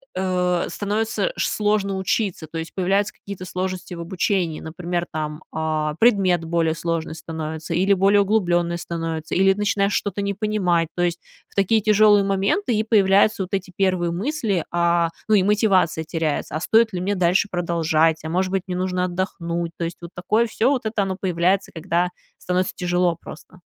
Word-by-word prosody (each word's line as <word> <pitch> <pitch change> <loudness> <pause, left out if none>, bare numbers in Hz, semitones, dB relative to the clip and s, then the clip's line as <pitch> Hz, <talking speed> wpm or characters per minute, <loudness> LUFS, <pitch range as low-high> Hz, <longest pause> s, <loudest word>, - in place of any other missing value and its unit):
э, 180 -1 0
становится, 220 - -1
шс - - 0
сложно 205 -2 0
учиться. 190 -2 -1
То 165 - -7
есть 160 - -7
появляются 195 +2 +1
какие-то 200 -2 -9
сложности 185 0 -4
в - - -9
обучении. 175 -1 -1
Например, 175 +2 -3
там, 150 -1 -4
а, 155 -1 -1
предмет 190 -7 +3
более 165 -1 +1
сложный 165 -1 -3
становится, 160 0 -5
или 190 +4 +3
более 200 +2 +4
углублённый 175 -4 +1
становится, 165 -2 -4
или 195 +1 +5
начинаешь 200 0 0
что-то 205 0 -1
не 200 0 -1
понимать, 190 -5 0
то 175 - -1
есть 175 -1 0 0.3
в - - -25
такие 205 +3 +3
тяжёлые 210 -1 +5
моменты 200 - 0
и 215 0 +1
появляются 205 -2 +3
вот 185 - -10
эти 195 -1 -2
первые 185 -3 +1
мысли, 210 - -1
а, 170 -1 +2 0.2
ну 215 - +4
и 195 - +4
мотивация 195 -5 +2
теряется: 155 -2 -2
"А 155 - -2
стоит 225 +3 +3
ли 180 - -3
мне 200 +3 0
дальше 180 +2 +2
продолжать, 165 -2 +1
а 160 - -4
может 185 +2 0
быть, 190 -2 0
мне 180 -1 -3
нужно 180 0 0
отдохнуть?" 170 -2 -3
То - - -3
есть 165 +1 -5
вот 170 0 -9
такое 215 +6 +1
всё, 230 +2 +1
вот 265 -5 0
это 220 -1 0
оно 190 -1 -3
появляется, 185 +1 +1
когда 175 +1 0 0.3
становится 180 +1 -1
тяжело 175 -1 +1
просто. 180 +3 -12
185 Hz, 175 wpm, -22 LUFS, 170-200 Hz, 0.3 s, или